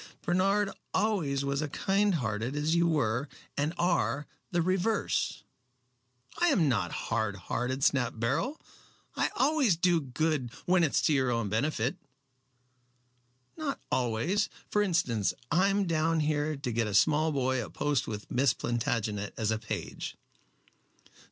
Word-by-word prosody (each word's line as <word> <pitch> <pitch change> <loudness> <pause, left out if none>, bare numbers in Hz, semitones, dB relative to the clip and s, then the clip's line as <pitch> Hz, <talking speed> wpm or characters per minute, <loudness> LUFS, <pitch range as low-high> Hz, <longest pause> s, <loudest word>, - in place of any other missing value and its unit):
"Bernard 195 +3 +2 0.2
always 170 -10 +1
was 140 +1 0
as 155 - -2
kind 195 +5 +1
hearted 115 -1 -2
as 150 +2 +1
you 170 0 +3
were 140 -4 0 0.3
and 145 +2 0
are, 170 -4 +1 0.2
the 175 - 0
reverse." 190 +4 0 1.0
"I 350 - +4
am 195 - +3
not 100 -9 +1
hard 110 -3 -1
hearted," 125 +8 -3
snapped 125 -6 +2
Beryl. 135 - -1 0.6
"I - - +1
always 275 - +3
do 175 -1 +3
good 145 -1 -1
" - - -22
"When 180 -1 +4
it 155 - +1
is - - +3
to 155 - +3
your 130 -2 +2
own 115 -4 0
benefit." 120 +3 0 1.6
"Not 305 -3 -3
always. 130 - +1 0.2
For 210 - +3
instance, 130 - +1 0.2
I 180 +5 +4
am 200 0 +2
down 165 -1 +1
here 150 0 0
to 140 -3 -4
get 115 -1 0
a 105 - -2
small 155 +9 +4
boy 130 -3 0
a - - -8
post 145 -3 0
with 105 -1 -6
Miss 135 +2 +3
Plantagenet 110 -3 -2
as 110 -1 0
a 110 - 0
page." 110 - -5
145 Hz, 150 wpm, -30 LUFS, 120-175 Hz, 1.6 s, I